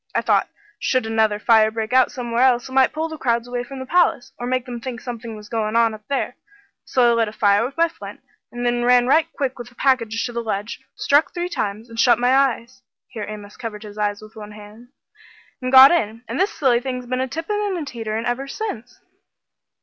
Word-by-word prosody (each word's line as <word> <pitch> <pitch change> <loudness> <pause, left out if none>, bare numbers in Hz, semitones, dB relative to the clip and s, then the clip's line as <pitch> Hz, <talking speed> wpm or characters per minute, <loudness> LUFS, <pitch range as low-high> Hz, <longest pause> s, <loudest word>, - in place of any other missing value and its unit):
I - - +2
thought - - +1 0.3
should 255 -3 0
another 220 -1 +1
fire 220 0 +4
break 220 +1 -4
out 260 -1 +4
somewhere 240 -2 -2
else, 250 -1 +3
it - - -12
might 265 0 +4
pull 315 +1 -2
the 315 -1 -8
crowds 235 -1 0
away 245 0 -3
from 270 +2 -9
the 260 - -6
palace, 345 -3 +1
or 245 - -4
make 255 0 -1
them 245 -2 -6
think 245 -2 -6
something 230 -2 -7
was 210 -1 -11
goin' 220 -1 -2
on 230 -1 +3
up 215 - -10
there. 280 - -2 0.5
So 245 -2 +3
I - - +3
lit 230 -1 +1
a - - -5
fire 205 0 +2
with 265 +5 -5
my 335 0 +4
flint, 330 - -11 0.3
and 245 0 -5
then 240 0 +1
ran 245 0 +4
right 320 +5 +3
quick 265 -4 -3
with 240 - -8
the 245 - -24
package 230 -5 +1
to 240 - -5
the 235 - -2
ledge, 215 0 -4 0.2
struck 290 +5 +2
three 350 0 -2
times, 215 - -3
and 230 -1 -9
shut 240 0 +5
my 245 +2 +2
eyes" 260 -2 0 0.3
here 215 -4 -6
Amos 210 -1 -9
covered 220 -3 -7
his 210 0 -10
eyes 205 0 -1
with 215 +1 -14
one 210 -1 -10
hand 210 +3 -13 0.7
"and 255 0 -2
got 265 +2 +10
in. 230 -8 -1
And - - -4
this 390 +3 +2
silly 260 - +2
thing's 250 0 -5
been 255 +1 -2
a 260 - -1
tippin' 330 +9 -3
and 400 -3 -1
a 320 - -4
teeterin' 225 -3 -4
ever 245 +3 -2
since." 250 - -6
240 Hz, 235 wpm, -21 LUFS, 220-260 Hz, 0.7 s, got